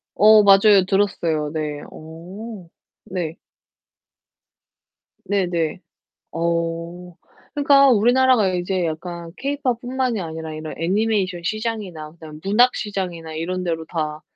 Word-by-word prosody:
어 215 0 +7
맞아요. 195 -1 +6
들었어요. 170 -7 0
네. 150 -2 -3
어 180 +5 -10 0.4
네. 175 -3 -4 1.9
네네. 175 -4 -1 0.5
어 170 +1 -3 0.4
그니까 280 -1 +5
우리나라가 245 -1 +4
이제 180 0 -1
약간 170 +1 -5
케이팝뿐만이 255 -4 -2
아니라 160 -1 -6
이런 155 0 -6
애니메이션 190 0 0
시장이나 205 -7 -4
그다음에 155 -2 -12
문학 240 +6 +4
시장이나 180 -6 -4
이런 180 +3 -3
데로 165 -2 -3
다 155 -2 -4
180 Hz, 255 characters per minute, -21 LUFS, 165-215 Hz, 1.9 s, 어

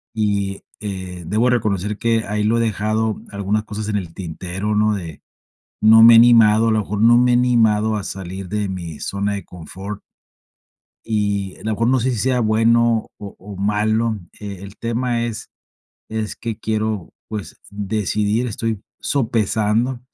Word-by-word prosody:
Y 100 -2 -1 0.2
eh, 95 -4 -6
debo 110 +6 +2
reconocer, 105 -3 0
que 115 -1 +1
ahí 105 +1 -1
lo 115 +2 +2
he - - +2
dejado, 110 0 -1
algunas 100 +2 -1
cosas 110 0 -5
en 105 - 0
el 85 -4 -5
tintero, 95 +4 -4
¿no? 105 0 +2
De, 85 -6 -7 0.6
no 110 +1 +8
me 115 0 +10
he - - +9
animado. 115 -1 +6
A - - +3
lo 110 - +2
mejor, 105 +1 -3
no 120 +1 +6
me 125 0 +4
he - - +4
animado 110 -3 +3
a 100 - -3
salir 95 0 -6
de 105 0 -2
mi 85 -5 -6
zona 100 +1 -2
de 100 - -5
confort. 95 +4 -8 1.0
Y, 100 -3 -1
a - - -15
lo 110 - -1
mejor, 115 +2 0
no 130 +1 +3
sé 130 - +1
si 120 - -2
sea 125 +3 +1
bueno 115 +1 +3
o 100 -1 -9
o 100 +1 -10
malo. 110 +2 0 0.2
E 100 -3 -7
el 100 +1 -10
tema, 115 0 -1
es 115 -2 -6 0.6
es 110 -1 -3
que 115 -3 -5
quiero, 110 -4 -2 0.2
pues, 105 -3 -6
decidir. 105 +2 -1
Estoy 110 -2 -3 0.2
sopesando, 115 -1 0
105 Hz, 170 wpm, -20 LUFS, 100-115 Hz, 1.0 s, me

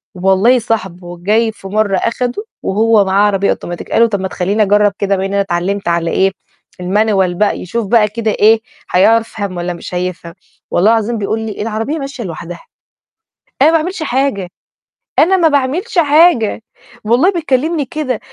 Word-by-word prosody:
والله 195 +7 +3
صاحبه 185 -6 -4
جاي 220 +5 +1
في 195 -3 -12
مرة 205 -1 0
أخده 245 - -2 0.2
وهو 215 0 +2
معاه 200 +2 +3
عربية 200 -1 0
أوتوماتيك 175 0 -4
قال - - +3
له: 230 - +6
"طَب 200 -3 -2
ما 190 - -2
تخلّيني 200 +4 0
أجرب 205 0 +3
كده 200 0 +1
بما 190 0 -2
إن 195 - -4
أنا 200 0 +2
تعلمت 195 +1 -2
على 170 -1 0
إيه، 195 0 +2 0.5
المانيوال 190 -1 +1
بقى" 210 +2 +1
يشوف 215 +3 -4
بقى 215 -1 +4
كده 220 +1 -2
إيه، 220 +2 +4 0.3
هيعر 225 +5 +4
فهم 200 -5 -6
والّا 175 0 -3
مش 170 - -9
هيفهم، 180 -2 -4 0.4
والله 205 +6 +3
العظيم 225 +1 0
بيقول 215 +2 -2
لي: 220 -2 -5
"العربية 225 +8 -3
ماشية 275 -3 -6
لوحدها، 170 0 -7 1.0
أنا 300 - +7
ما 330 - +4
باعملش 330 +1 -4
حاجة 255 - -1 0.7
أنا 380 +3 +4
ما 335 -2 +4
باعملش 305 - -1
حاجة"، 295 -8 +3 0.4
والله 250 - +3
بيكلمني 310 -2 -1
كده، 260 -4 -3
215 Hz, 170 wpm, -15 LUFS, 190-245 Hz, 1.0 s, أنا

